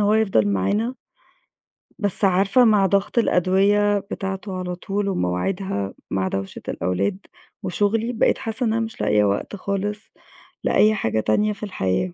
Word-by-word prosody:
هو 210 +1 +3
يفضل 195 - +2
معانا. 205 - 0 1.1
بس 205 -1 +2
عارفة 195 +6 +4
مع 210 -3 +4
ضغط 200 +4 0
الأدوية 205 +1 +3
بتاعته 195 0 -5
على 180 -1 -4
طول 200 +2 -2
ومواعيدها 100 - -2 0.2
مع 95 -1 0
دَوشة 95 0 -4
الأولاد 90 - -1 0.5
وشُغلي، 205 +6 0
بقيت 225 - +2
حاسّة 225 +3 -2
إن 220 - +1
أنا 225 - 0
مش 225 - -9
لاقية 105 0 +3
وقت 100 - -1
خالص 200 +2 -3 0.6
لأي 215 0 +4
حاجة 110 - -1
تانية 210 - +1
في 205 - -12
الحياة، 180 - -1
195 Hz, 145 wpm, -22 LUFS, -, 1.1 s, عارفة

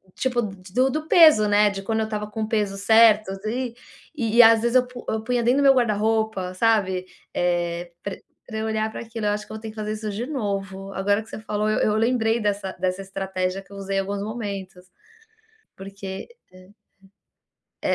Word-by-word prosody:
tipo 245 -2 0
do 195 +5 -1
do 310 +2 -3
peso, 310 -13 +7
né. 205 0 +4
De 195 0 -6
quando 220 +2 -1
eu 220 - 0
estava 210 -1 -3
com 220 - -4
o 215 - -4
peso 205 -3 0
certo. 215 0 +5 0.2
E 245 +1 -3 0.4
e 230 -5 -1
e, 240 - +11
às 225 0 +6
vezes, 235 +1 0
eu 255 -1 +4
pu 250 -1 -10
eu 220 0 -2
punha 245 0 0
dentro 250 +4 +3
do - - +2
meu 275 -1 +7
guarda-roupa, 220 -4 0
sabe, 190 -4 +1 0.3
eh, 175 0 -1
pra 200 - -4 0.3
pra 220 - -6
eu 220 - -2
olhar 220 0 -1
para - - -7
aquilo. 225 -2 -4
Eu 205 - +2
acho 210 0 -4
que - - -9
eu 220 - -6
ter 220 - -7
que 215 - -12
fazer 215 -1 -4
isso 215 0 -5
de 220 +4 -4
novo. 195 -7 -4
Agora 200 +2 +1
que - - -18
você - - -7
falou 215 -1 -2
eu 215 - +1
eu 210 - +2
lembrei 230 0 +2
dessa 200 -2 -1
dessa 185 +1 -1
estratégia 190 -1 -3
que 195 - -24
eu - - -9
usei 195 0 -3
em - - +3
alguns 200 +1 -4
momentos. 200 -5 -6 0.9
Porque 195 - -8 0.2
aham. 185 +2 -17 1.1
É - - +1
210 Hz, 210 wpm, -23 LUFS, 195-225 Hz, 1.1 s, e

